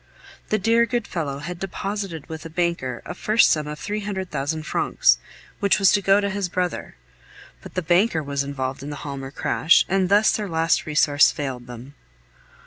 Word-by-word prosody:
The 215 - +2
dear, 230 +3 +3
good 240 -2 -1
fellow 150 -6 -3
had 170 +4 -7
deposited 195 -4 -5
with 160 -2 -7
a 165 - -8
banker 165 -7 -2
a - - -5
first 215 +5 +3
sum 150 -1 0
of 150 0 -5
three 210 +6 -4
hundred 195 -3 -5
thousand 155 +3 -2
francs, - - +2 0.4
which 200 -2 +3
was 195 -3 +5
to 205 - +2
go 195 +1 +4
to 200 - 0
his 195 -2 -2
brother, 180 0 -3 0.7
but - - -12
the 185 - -1
banker 175 0 +2
was 140 -1 -2
involved 135 -2 -4
in 140 - -7
the 145 - -7
Halmer 135 -2 -5
crash, 155 +3 +3
and 190 -1 +1
thus 205 +2 +5
their 210 -2 -2
last 165 -1 +1
resource 145 -1 +4
failed 130 -4 -5
them. 125 +3 -10
170 Hz, 190 wpm, -23 LUFS, 145-195 Hz, 0.7 s, was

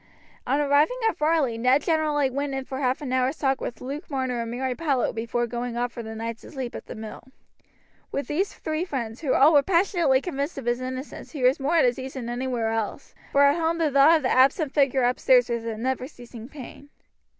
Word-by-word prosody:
On 280 - +2
arriving 295 - +3
at 445 - 0
Varley 300 -7 +1
Ned 255 +4 +3
generally 305 -4 +1
went 280 +1 -2
in 270 0 -4
for 265 -1 -5
half 260 +2 0
an 255 -3 -3
hour's 260 +3 +1
talk 270 -2 0
with 245 - -5
Luke 280 +6 -6
Marner 260 -4 -2
and 230 - -4
Mary 255 +2 -2
Powlett 275 -3 0
before 235 +2 -1
going 240 0 -4
off 245 0 -1
for 235 - -7
the 220 -1 -7
night 230 +1 -5
to - - -13
sleep 260 -4 -5
at - - -8
the - - -7
mill. 220 -1 -8 0.9
With 280 - -2
these 370 +7 -1
three 315 +1 -3
friends, 240 -9 -4
who 280 -5 +1
all 295 +4 +6
were 290 - +7
passionately 340 -5 +2
convinced 280 0 -4
of 270 - -6
his 240 +1 0
innocence, 260 +5 -7
he 280 -5 -4
was 255 +4 +4
more 285 +5 0
at 320 - +5
his 245 +1 +1
ease 265 +1 -7
than 240 -3 -5
anywhere 240 -2 -2
else, 225 +4 -4 0.2
for 280 - +4
at 285 +4 +4
home 330 0 0
the 320 -3 +1
thought 280 +4 +6
of 310 - -6
the 255 - +1
absent 270 +3 +3
figure 275 -3 +2
upstairs 250 0 +3
was 235 -1 -2
a 225 -1 -4
never 255 +2 -2
ceasing 240 -4 -12
pain. 285 0 -11
265 Hz, 230 wpm, -25 LUFS, 245-290 Hz, 0.9 s, were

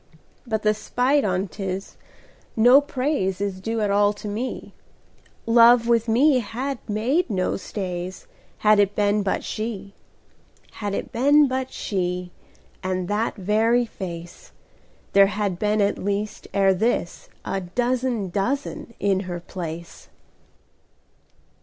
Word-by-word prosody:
But 220 -2 -1
the 215 0 +4
spite 255 +6 +1
on 185 0 0
't 195 +2 -8
is, 190 +1 -4 0.6
no 245 +5 +7
praiseIs 205 -10 -2
due 225 +2 -2
at 205 -1 +1
all 205 +1 +3
to 210 +1 -9
me:Love 235 +1 +1
with 235 -1 +2
me 255 +4 +4
had 250 +4 -4
made 250 - +1
no 185 -4 0
stays, 185 -2 -5 0.3
Had 215 -1 +4
it 205 0 +3
any 205 -1 +3
been - - +1
but 195 -1 -1
she. 210 -3 -5 0.8
Had 205 -2 -4
it - - -5
any 255 +5 +1
been 295 -1 +7
but 260 0 -3
she, 180 -2 -3 0.5
And 185 -1 -2
that 215 +3 0
very 225 +4 +2
face, 175 -5 -8 0.6
There 195 0 +7
had 200 -2 -2
been 210 0 +1
at 200 - 0
least 205 +1 -3
ere 195 -1 +3
thisA 190 -2 -3
dozen 245 -5 0
dozen 265 - -3
in 195 -1 +2
her 175 0 -4
place. 170 -1 -8
210 Hz, 130 wpm, -23 LUFS, 190-240 Hz, 0.8 s, no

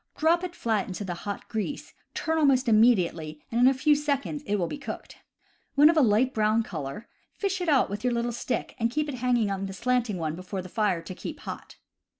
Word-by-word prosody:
Drop 335 +3 +2
it 355 -1 -5
flat 220 -4 0
into 190 +2 -5
the 180 - -3
hot 200 +4 -6
grease, 230 +6 -4 0.2
turn 320 0 0
al 305 - +4
most 260 -2 +3
immediately, 180 -9 +3
and 235 +1 +1
in 250 - +7
a 265 - +5
few 295 +4 +4
seconds 290 0 -1
it 205 - +1
will 180 -4 0
b^ 285 - -6
cooked. - - -7 0.6
When 295 +3 +7
of - - -3
a 310 - +5
light 245 +2 +3
brown 215 +1 +2
color, 155 -2 -6 0.3
fish 385 -2 -2
it 350 - 0
out 280 -3 +4
with 205 +3 -5
your 250 - +2
little 240 0 0
stick 240 +2 -3
and 230 0 +1
hang 255 -4 0
it 220 -3 +1
on 195 0 -2
the 195 - -7
slanting 240 -1 0
one 160 -2 -2
before 185 +1 -5
the 185 - -10
fire 195 -5 0
to - - -7
keep - - -7
hot. - - -8
235 Hz, 225 wpm, -27 LUFS, 195-280 Hz, 0.6 s, in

